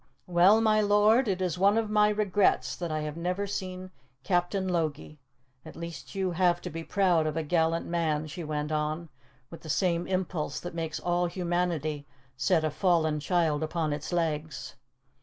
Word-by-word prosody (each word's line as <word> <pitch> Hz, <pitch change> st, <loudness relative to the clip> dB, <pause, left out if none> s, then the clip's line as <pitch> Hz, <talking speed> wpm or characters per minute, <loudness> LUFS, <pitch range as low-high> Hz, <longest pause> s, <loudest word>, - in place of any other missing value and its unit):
"Well, 180 Hz, +5 st, +5 dB
my 215 Hz, -1 st, +3 dB
lord, 210 Hz, +4 st, +4 dB
it 190 Hz, -2 st, 0 dB
is 180 Hz, -1 st, -2 dB
one 200 Hz, +3 st, +4 dB
of 225 Hz, -1 st, +1 dB
my 210 Hz, 0 st, +4 dB
regrets 205 Hz, -2 st, +1 dB
that 170 Hz, -2 st, -4 dB
I 155 Hz, 0 st, -1 dB
have 150 Hz, 0 st, -4 dB
never 180 Hz, +4 st, -2 dB
seen 185 Hz, -2 st, -5 dB, 0.3 s
Captain 180 Hz, +4 st, 0 dB
Logie. 155 Hz, -4 st, -2 dB, 0.4 s
At -, -, -11 dB
least 170 Hz, +3 st, -8 dB
you 190 Hz, -2 st, 0 dB
have 175 Hz, 0 st, +2 dB
to 180 Hz, -, -6 dB
be 165 Hz, +1 st, -5 dB
proud 175 Hz, -4 st, +2 dB
of 155 Hz, +1 st, -2 dB
a 160 Hz, -, 0 dB
gallant 165 Hz, +1 st, +1 dB
man," 160 Hz, -3 st, -1 dB
she 155 Hz, +3 st, -7 dB
went 150 Hz, 0 st, -3 dB
on, 155 Hz, +2 st, -2 dB, 0.4 s
with 165 Hz, -, -10 dB
the 160 Hz, -, -10 dB
same 170 Hz, +2 st, +1 dB
impulse 180 Hz, -6 st, -2 dB
that 175 Hz, -, -7 dB
makes 165 Hz, -2 st, -3 dB
all 175 Hz, 0 st, 0 dB
humanity 170 Hz, -4 st, -2 dB, 0.3 s
set 150 Hz, +4 st, +2 dB
a 155 Hz, -, 0 dB
fallen 160 Hz, -3 st, +1 dB
child 160 Hz, -2 st, +1 dB
upon 155 Hz, -1 st, -1 dB
its 150 Hz, +3 st, -5 dB
legs. 155 Hz, -4 st, -2 dB
170 Hz, 175 wpm, -28 LUFS, 155-185 Hz, 0.4 s, Well